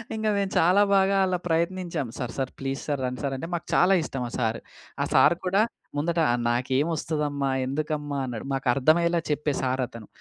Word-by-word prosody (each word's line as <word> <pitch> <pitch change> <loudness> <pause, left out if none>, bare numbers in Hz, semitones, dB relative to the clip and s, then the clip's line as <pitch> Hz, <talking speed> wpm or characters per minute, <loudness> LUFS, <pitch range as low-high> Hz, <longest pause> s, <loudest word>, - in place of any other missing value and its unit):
ఇంగ 220 0 -2
మేము 200 -1 0
చాలా 180 +5 +5
బాగా 195 0 +3
అలా 185 -1 0
ప్రయత్నించాం. 170 -3 -1
సర్ 120 -2 -4
సర్ 130 -1 -2
ప్లీస్ 135 0 -3
సర్ 145 -2 -1
రండి 125 +2 -4
సర్ 135 -1 -1
అంటే 165 - -5
మాకు 170 - -3
చాలా 185 +2 +5
ఇష్టం 135 -4 -4
ఆ - - -13
సార్. 115 -2 0 0.4
ఆ - - 0
సార్ 170 - +6
కూడా 195 +3 +3 0.4
ముందట 165 +2 0 0.3
నాకేం 130 +5 +1
ఒస్తదమ్మా? 145 -3 -1 0.2
ఎందుకమ్మా? 150 +1 -2
అన్నాడు. 120 -2 -5
మాకు 135 0 -2
అర్థమయ్యేలా 170 +5 +3
చెప్పే 150 0 0
సార్ 130 0 0
అతను. 115 -4 -11
150 Hz, 180 wpm, -26 LUFS, 135-170 Hz, 0.4 s, సార్